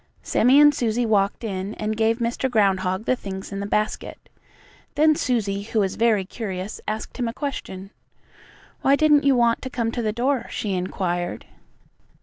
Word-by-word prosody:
Sammie 255 Hz, +5 st, +4 dB
and 295 Hz, 0 st, +7 dB
Susie 240 Hz, -3 st, 0 dB
walked 205 Hz, +1 st, +1 dB
in 195 Hz, -1 st, -4 dB
and 215 Hz, 0 st, -2 dB
gave 225 Hz, +1 st, +2 dB
Mr. 240 Hz, +2 st, -1 dB
Groundhog 190 Hz, -3 st, +1 dB
the 255 Hz, -, +2 dB
things 190 Hz, -4 st, -7 dB
in 195 Hz, -, -4 dB
the 200 Hz, -, -3 dB
basket. 210 Hz, +1 st, -3 dB, 0.7 s
Then 310 Hz, +1 st, +4 dB
Susie, 210 Hz, -8 st, -1 dB
who 220 Hz, +2 st, -2 dB
was 195 Hz, -2 st, +1 dB
very 220 Hz, -4 st, +2 dB
curious, 195 Hz, -1 st, -6 dB
asked 215 Hz, +1 st, -4 dB
him 245 Hz, -2 st, -1 dB
a 230 Hz, -, -3 dB
question. 200 Hz, -9 st, -6 dB, 0.9 s
"Why 275 Hz, -, +4 dB
didn't 295 Hz, -1 st, +4 dB
you 275 Hz, -1 st, +5 dB
want 235 Hz, -1 st, +2 dB
to 260 Hz, -, -5 dB
come 230 Hz, -3 st, -2 dB
to 240 Hz, -, -3 dB
the 215 Hz, -2 st, 0 dB
door?" 245 Hz, +2 st, -1 dB
she 205 Hz, -3 st, -3 dB
inquired. 180 Hz, -1 st, -3 dB
220 Hz, 170 wpm, -23 LUFS, 195-245 Hz, 0.9 s, and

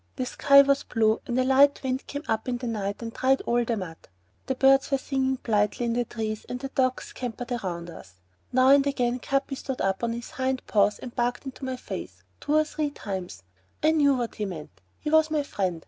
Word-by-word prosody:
The 255 Hz, -, -2 dB
sky 280 Hz, +2 st, +6 dB
was 280 Hz, 0 st, +2 dB
blue 220 Hz, -1 st, +1 dB
and 245 Hz, +1 st, 0 dB
a -, -, +3 dB
light 275 Hz, +3 st, +4 dB
wind 260 Hz, 0 st, 0 dB
had -, -, -33 dB
come 285 Hz, +1 st, -5 dB
up 220 Hz, +3 st, -1 dB
in 245 Hz, -, -1 dB
the 245 Hz, -, -6 dB
night 210 Hz, -2 st, -3 dB
and 230 Hz, 0 st, -6 dB
dried 265 Hz, +1 st, +2 dB
all 240 Hz, 0 st, +1 dB
the 230 Hz, -1 st, -1 dB
mud. 170 Hz, -4 st, -6 dB, 0.5 s
The 265 Hz, -, 0 dB
birds 270 Hz, +1 st, +4 dB
were 275 Hz, -, +2 dB
singing 265 Hz, -1 st, -1 dB
blithely 210 Hz, +1 st, +1 dB
in 230 Hz, -, 0 dB
the 240 Hz, 0 st, 0 dB
trees 220 Hz, -2 st, -4 dB
and 250 Hz, -, -4 dB
the 270 Hz, +1 st, -5 dB
dogs 255 Hz, -1 st, 0 dB
scampered 245 Hz, 0 st, -6 dB
around 175 Hz, -7 st, -4 dB
us. 95 Hz, -, -13 dB, 0.4 s
Now 255 Hz, +1 st, +4 dB
and 280 Hz, 0 st, +6 dB
again 250 Hz, -3 st, 0 dB
Capi 275 Hz, +2 st, -1 dB
stood 265 Hz, -1 st, -5 dB
up 190 Hz, +3 st, -1 dB
on 230 Hz, -1 st, 0 dB
his 235 Hz, +1 st, -7 dB
hind 260 Hz, -1 st, -2 dB
paws 205 Hz, -1 st, +2 dB
and 245 Hz, -, -9 dB
barked 245 Hz, +3 st, -1 dB
into 265 Hz, 0 st, -7 dB
my 260 Hz, 0 st, -2 dB
face, 95 Hz, -, -8 dB, 0.2 s
two 295 Hz, -, -1 dB
or 310 Hz, -, +5 dB
three 305 Hz, -1 st, -2 dB
times. 190 Hz, -, -6 dB, 0.4 s
I 310 Hz, -, +5 dB
knew 290 Hz, -3 st, +4 dB
what 240 Hz, -2 st, -3 dB
he 210 Hz, -, -3 dB
meant. 165 Hz, -6 st, -7 dB, 0.3 s
He 300 Hz, -, -3 dB
was 315 Hz, 0 st, +5 dB
my 305 Hz, -2 st, 0 dB
friend. 185 Hz, -, -2 dB
250 Hz, 230 wpm, -26 LUFS, 220-270 Hz, 0.5 s, sky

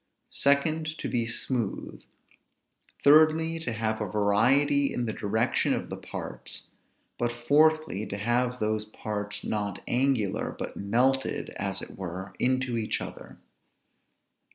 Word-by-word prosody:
Secondly, 155 Hz, +3 st, +1 dB
to -, -, -4 dB
be 115 Hz, -2 st, 0 dB
smooth. 120 Hz, -2 st, -2 dB, 1.0 s
Thirdly, 160 Hz, +2 st, +5 dB
to 160 Hz, -7 st, -3 dB
have 110 Hz, -1 st, -1 dB
a 105 Hz, -, -1 dB
variety 125 Hz, +8 st, +3 dB
in 120 Hz, -, -2 dB
the 110 Hz, -, -2 dB
direction 110 Hz, +4 st, +1 dB
of -, -, -5 dB
the -, -, -2 dB
parts; -, -, -8 dB, 0.5 s
but, 120 Hz, 0 st, +1 dB
fourthly, 145 Hz, -2 st, +2 dB
to 100 Hz, -, -4 dB
have 120 Hz, +4 st, 0 dB
those 110 Hz, 0 st, 0 dB
parts 105 Hz, -1 st, -4 dB
not 105 Hz, -2 st, -3 dB
angular, 125 Hz, -5 st, +1 dB
but -, -, -5 dB
melted, 125 Hz, +7 st, +1 dB
as 95 Hz, -1 st, -1 dB
it -, -, -10 dB
were, 95 Hz, +1 st, -6 dB
into 130 Hz, -1 st, +1 dB
each 110 Hz, -1 st, -1 dB
other. -, -, -9 dB
120 Hz, 130 wpm, -28 LUFS, 105-140 Hz, 1.0 s, Thirdly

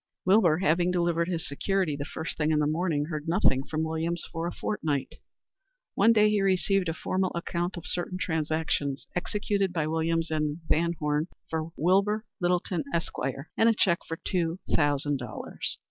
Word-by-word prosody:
Wilbur 185 Hz, -5 st, +5 dB
having 175 Hz, 0 st, +2 dB
delivered 170 Hz, -1 st, +1 dB
his 175 Hz, -2 st, -2 dB
security 180 Hz, +2 st, 0 dB
the 145 Hz, 0 st, -4 dB
first 160 Hz, -, -4 dB
thing 150 Hz, -1 st, 0 dB
in 155 Hz, -, +3 dB
the 150 Hz, -, +2 dB
morning, 155 Hz, -1 st, 0 dB
heard 155 Hz, 0 st, -4 dB
nothing 165 Hz, -6 st, +3 dB
further 135 Hz, -, -13 dB
from 155 Hz, 0 st, -1 dB
Williams 160 Hz, +2 st, -2 dB
for 165 Hz, 0 st, -2 dB
a -, -, -2 dB
fortnight. 150 Hz, -11 st, -2 dB, 0.8 s
One 230 Hz, -, +5 dB
day 215 Hz, -2 st, +5 dB
he 210 Hz, -1 st, +2 dB
received 195 Hz, -1 st, +2 dB
a -, -, -1 dB
formal 185 Hz, +1 st, -1 dB
account 175 Hz, +1 st, -2 dB
of 170 Hz, -, -7 dB
certain 180 Hz, +1 st, -2 dB
transactions 155 Hz, -4 st, -1 dB
executed 200 Hz, +1 st, 0 dB
by 160 Hz, -4 st, 0 dB
Williams 165 Hz, +1 st, 0 dB
and 150 Hz, -1 st, 0 dB
VanHorne 155 Hz, -2 st, +1 dB, 0.2 s
for 160 Hz, 0 st, -2 dB
Wilbur 200 Hz, +6 st, +2 dB
Littleton, 175 Hz, -2 st, 0 dB
Esq., 170 Hz, -1 st, -1 dB, 0.4 s
and 225 Hz, -, +5 dB
a 225 Hz, -, +3 dB
check 175 Hz, -4 st, +3 dB
for 165 Hz, -, -4 dB
two 170 Hz, -2 st, 0 dB, 0.2 s
thousand 145 Hz, -1 st, +2 dB
dollars. 120 Hz, -4 st, -5 dB
170 Hz, 170 wpm, -28 LUFS, 155-185 Hz, 0.8 s, Wilbur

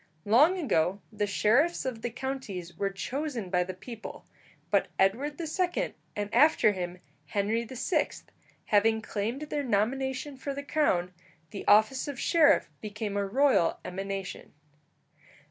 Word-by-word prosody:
Long 290 Hz, -, +5 dB
ago 190 Hz, -, +1 dB
the 205 Hz, -1 st, -1 dB
sheriffs 250 Hz, -, +2 dB
of 245 Hz, -4 st, -3 dB
the 240 Hz, -, -2 dB
counties 230 Hz, -9 st, -5 dB
were 200 Hz, +2 st, -1 dB
chosen 245 Hz, -, -4 dB
by 180 Hz, -1 st, +3 dB
the 185 Hz, 0 st, -6 dB
people; 225 Hz, +4 st, -9 dB, 0.5 s
but -, -, +3 dB
Edward 260 Hz, -, +1 dB
II., 350 Hz, +2 st, -1 dB, 0.2 s
and 205 Hz, +1 st, -4 dB
after 280 Hz, -4 st, +5 dB
him 180 Hz, -2 st, -5 dB, 0.3 s
Henry 215 Hz, +3 st, 0 dB
VI., 260 Hz, +7 st, 0 dB, 0.6 s
having 220 Hz, +1 st, +3 dB
claimed 225 Hz, +6 st, -3 dB
their 300 Hz, -1 st, -2 dB
nomination 265 Hz, +4 st, -1 dB
for 275 Hz, +1 st, -4 dB
the 280 Hz, -, -5 dB
crown, 185 Hz, -, +1 dB, 0.4 s
the 200 Hz, -, -7 dB
office 220 Hz, +7 st, +4 dB
of 280 Hz, -3 st, -5 dB
sheriff 325 Hz, -4 st, +4 dB
became 210 Hz, -1 st, -4 dB
a 200 Hz, -1 st, 0 dB
royal 255 Hz, -6 st, +3 dB
emanation. 195 Hz, +1 st, -5 dB
225 Hz, 135 wpm, -29 LUFS, 200-275 Hz, 0.6 s, Long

